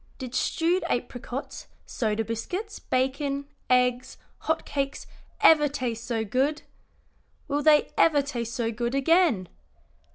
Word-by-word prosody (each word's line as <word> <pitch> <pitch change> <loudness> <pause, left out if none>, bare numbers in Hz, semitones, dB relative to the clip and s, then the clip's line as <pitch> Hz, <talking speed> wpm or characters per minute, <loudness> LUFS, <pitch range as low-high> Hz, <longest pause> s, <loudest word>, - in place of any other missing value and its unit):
"Did 255 -2 -7
stewed 340 +7 +1
apricots, 245 +2 -4 0.2
soda 220 -1 -1
biscuits, 360 - -4
bacon, 275 +2 -1 0.2
eggs, 250 0 +2 0.2
hot 320 0 -1
cakes, 275 -1 -3 0.4
ever 300 -2 +7
taste 245 -5 -4
so 225 -3 -1
good? 270 +8 0 0.8
Will 290 0 0
they 300 0 +4
ever 295 -3 +5
taste 235 -5 -4
so 230 -2 -1
good 235 +3 -2
again? 275 - +3
265 Hz, 120 wpm, -26 LUFS, 235-295 Hz, 0.8 s, ever